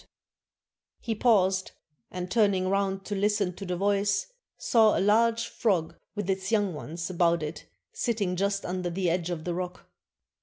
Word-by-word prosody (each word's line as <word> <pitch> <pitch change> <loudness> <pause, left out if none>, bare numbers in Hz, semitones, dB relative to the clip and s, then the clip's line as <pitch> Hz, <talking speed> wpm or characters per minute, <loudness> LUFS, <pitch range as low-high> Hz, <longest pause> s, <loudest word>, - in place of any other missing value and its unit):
'^ - - -22 1.0
He 230 - -2
paused, 195 -5 +2 0.4
and 180 0 -6
turning 200 -5 +3
round 195 0 0
to 210 - -4
listen 205 -2 +1
to 195 +2 -8
the 180 - -1
voice, 200 +1 +1 0.3
saw 220 -3 +4
a - - +1
large 225 +3 +3
frog 180 -8 0 0.2
with 205 -3 -3
its 190 0 -1
young 205 -4 +2
ones 165 +4 -5
about 170 -2 +2
it 150 -11 -7 0.2
sitting 205 -6 -1
just 200 +2 -1
under 180 0 -2
the 175 0 0
edge 175 0 -1
of 170 -3 -4
the 175 - -2
rock. 180 0 -5
190 Hz, 165 wpm, -28 LUFS, 180-205 Hz, 1.0 s, saw